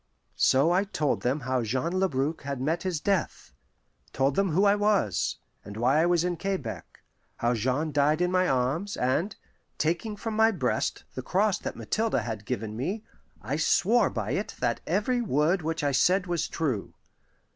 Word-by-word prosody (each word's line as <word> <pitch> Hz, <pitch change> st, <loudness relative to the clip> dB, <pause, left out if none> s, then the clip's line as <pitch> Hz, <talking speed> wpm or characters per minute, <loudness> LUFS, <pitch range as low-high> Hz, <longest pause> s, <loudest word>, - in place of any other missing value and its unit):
So 140 Hz, +6 st, +4 dB
I 185 Hz, +3 st, +3 dB
told 155 Hz, -8 st, -1 dB
them 130 Hz, +5 st, 0 dB
how 130 Hz, 0 st, 0 dB
Jean 130 Hz, +9 st, -1 dB
Labrouk 160 Hz, -5 st, 0 dB
had 140 Hz, -2 st, -4 dB
met 155 Hz, +6 st, -1 dB
his 180 Hz, -4 st, -2 dB
death; 195 Hz, +3 st, -2 dB, 0.6 s
told 135 Hz, +1 st, +1 dB
them 195 Hz, -1 st, +2 dB
who 185 Hz, +6 st, +3 dB
I 200 Hz, -, +6 dB
was, 205 Hz, -, +1 dB, 0.3 s
and 100 Hz, +1 st, -9 dB
why 130 Hz, +7 st, +3 dB
I 170 Hz, -, +3 dB
was 175 Hz, -1 st, +2 dB
in 175 Hz, -1 st, -1 dB
Quebec 190 Hz, -, -5 dB, 0.3 s
how 120 Hz, +1 st, +1 dB
Jean 130 Hz, +7 st, -1 dB
died 145 Hz, +2 st, +2 dB
in 180 Hz, 0 st, +1 dB
my 185 Hz, 0 st, +2 dB
arms; 140 Hz, +10 st, 0 dB
and, 160 Hz, +11 st, 0 dB, 0.4 s
taking 175 Hz, +7 st, -1 dB
from 220 Hz, +1 st, -4 dB
my 220 Hz, +1 st, +5 dB
breast 155 Hz, -, -1 dB
the 130 Hz, -, -4 dB
cross 195 Hz, +8 st, +1 dB
that -, -, -5 dB
Mathilde 215 Hz, -, -1 dB
had 110 Hz, -2 st, -5 dB
given 110 Hz, 0 st, -3 dB
me, 190 Hz, -, -3 dB, 0.4 s
I 130 Hz, +7 st, -2 dB
swore 215 Hz, +9 st, +3 dB
by -, -, -3 dB
it -, -, -2 dB
that -, -, 0 dB
every 245 Hz, +4 st, +1 dB
word 170 Hz, -, +1 dB
which 160 Hz, 0 st, -3 dB
I 145 Hz, -, +2 dB
said 180 Hz, +8 st, +3 dB
was 175 Hz, -3 st, -1 dB
true. 135 Hz, -11 st, -3 dB
160 Hz, 180 wpm, -27 LUFS, 130-190 Hz, 0.6 s, I